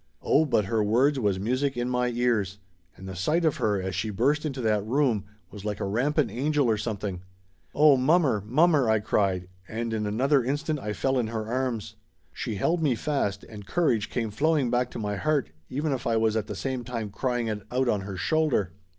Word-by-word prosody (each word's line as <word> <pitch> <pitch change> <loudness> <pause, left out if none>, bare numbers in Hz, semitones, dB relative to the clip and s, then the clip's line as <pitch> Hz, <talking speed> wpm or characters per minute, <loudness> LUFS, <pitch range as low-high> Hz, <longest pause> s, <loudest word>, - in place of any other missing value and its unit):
Oh, 160 - +4
but 110 -8 +1
her 110 +2 +1
words 130 +7 +3
was 100 -5 +1
music 130 +6 -1
in 120 0 -1
my 125 0 +1
ears! 115 -5 0 0.4
And 95 - -10
the 95 - -6
sight 155 - +1
of 155 - +2
her 105 -2 +1
as 95 0 -3
she 110 - -2
burst 140 +9 +1
into 135 -3 -5
that 105 -3 +1
room 120 -3 +1 0.3
was 105 -1 -9
like 105 -1 -3
a - - -2
rampant 135 +9 +1
angel 145 +2 +1
or 110 -2 +2
something. 100 -4 -4 0.5
"Oh, 150 -2 +6
mommer, 135 - +3
mommer!" 140 +2 +3
I 110 0 +4
cried, 95 -3 0 0.2
and 115 +1 -3
in 105 -1 -1
another 130 +6 +2
instant 150 +4 -1
I 105 -4 -4
fell 130 +3 0
in 115 - 0
her 110 -1 -3
arms. 120 -3 -2 0.4
She 110 - -4
held 165 - +1
me 140 -6 +2
fast 110 -8 -1
and 105 -2 -11
courage 125 -12 +1
come 115 -3 -2
flowing 145 +1 +1
back 125 0 +1
to - - -8
my 105 -2 -2
heart 150 - 0 0.2
even 145 +3 -1
if 130 -3 -2
I 115 -1 +2
was 110 -1 +2
at 110 -2 -1
the - - -5
same 130 -2 -3
time 115 -3 -4
crying 120 +2 -1
it 105 -2 -3
out 130 +1 +1
on 105 -4 +1
her 95 -1 -6
shoulder. 145 - +1
120 Hz, 210 wpm, -27 LUFS, 105-140 Hz, 0.5 s, Oh